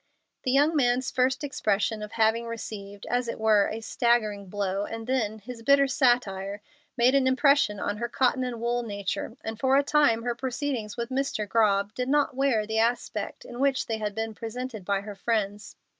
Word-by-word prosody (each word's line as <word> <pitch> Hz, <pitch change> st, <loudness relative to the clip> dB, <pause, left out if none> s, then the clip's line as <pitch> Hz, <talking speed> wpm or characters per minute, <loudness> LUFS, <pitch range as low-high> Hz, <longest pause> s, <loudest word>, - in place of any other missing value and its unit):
The 255 Hz, -, +2 dB
young 290 Hz, +4 st, +3 dB
man's 250 Hz, -2 st, +2 dB
first 260 Hz, +2 st, +1 dB
expression 215 Hz, -5 st, 0 dB
of 210 Hz, 0 st, -7 dB
having 225 Hz, +1 st, +2 dB
received, 205 Hz, -3 st, -7 dB
as 245 Hz, 0 st, 0 dB
it 230 Hz, -, -4 dB
were, 215 Hz, -2 st, +4 dB
a 220 Hz, +1 st, -5 dB
staggering 220 Hz, -4 st, +1 dB
blow, 195 Hz, 0 st, -2 dB
and 225 Hz, +1 st, -6 dB
then 225 Hz, -4 st, -1 dB
his 230 Hz, +2 st, -9 dB
bitter 280 Hz, +3 st, +5 dB
satire, 210 Hz, -7 st, +1 dB, 0.4 s
made 245 Hz, +2 st, +4 dB
an 275 Hz, -1 st, +3 dB
impression 260 Hz, -5 st, +3 dB
on 205 Hz, -, -2 dB
her 235 Hz, +2 st, -3 dB
cotton 255 Hz, +1 st, +1 dB
and 245 Hz, -2 st, -4 dB
wool 240 Hz, +1 st, 0 dB
nature, 205 Hz, +2 st, -4 dB
and 220 Hz, 0 st, -5 dB
for 265 Hz, +2 st, +3 dB
a 285 Hz, -, +4 dB
time 280 Hz, -6 st, +3 dB
her 240 Hz, 0 st, 0 dB
proceedings 250 Hz, -3 st, -3 dB
with 235 Hz, +1 st, -3 dB
Mr. 260 Hz, -5 st, -1 dB
Grobb 200 Hz, -1 st, +2 dB
did 250 Hz, +2 st, -3 dB
not 290 Hz, -2 st, +2 dB
wear 260 Hz, -6 st, +2 dB
the 220 Hz, +1 st, -1 dB
aspect 235 Hz, +2 st, -1 dB
in 240 Hz, -, -9 dB
which 275 Hz, -1 st, +2 dB
they 225 Hz, -1 st, -3 dB
had 210 Hz, -2 st, -3 dB
been 225 Hz, 0 st, -3 dB
presented 225 Hz, -2 st, -6 dB
by 200 Hz, 0 st, 0 dB
her 205 Hz, +1 st, -7 dB
friends. 205 Hz, -1 st, -2 dB
230 Hz, 190 wpm, -27 LUFS, 210-255 Hz, 0.4 s, bitter